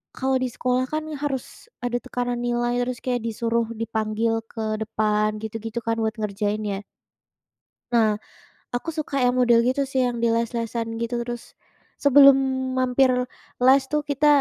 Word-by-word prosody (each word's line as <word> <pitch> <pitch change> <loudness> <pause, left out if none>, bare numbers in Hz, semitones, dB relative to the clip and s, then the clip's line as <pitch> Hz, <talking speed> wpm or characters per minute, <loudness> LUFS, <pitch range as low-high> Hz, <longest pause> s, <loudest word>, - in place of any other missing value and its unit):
kalau 265 0 0
di 255 - 0
sekolah 250 +1 0
kan 310 0 -2 0.2
harus 270 - -4 0.2
ada 245 0 0
tekanan 245 -1 -3
nilai, 240 0 0
terus 245 0 -2
kayak 245 -2 -1
disuruh 230 +1 0 0.2
dipanggil 220 0 0 0.2
ke 225 - -5 0.2
depan, 215 -1 +1
gitu-gitu 225 +1 -4
kan, 230 0 +1
buat 220 0 0
ngerjain 210 0 -1
ya. 200 -2 -2 1.1
Nah, 230 -2 +5 0.7
aku 245 +7 -3
suka 300 - -3
yang 250 0 +3
model 240 -2 +5
gitu 260 +2 +1
sih 265 - +1
yang 240 -1 -2
di 235 - +4
les-lesan, 230 0 -2 0.2
gitu. 235 +1 -2
Terus 240 0 -5 0.6
sebelum 275 -1 +8 0.4
mampir 255 +1 +3 0.5
les 265 +2 +7
tuh, 300 0 +2
kita 285 +2 +2
240 Hz, 150 wpm, -24 LUFS, 225-255 Hz, 1.1 s, sebelum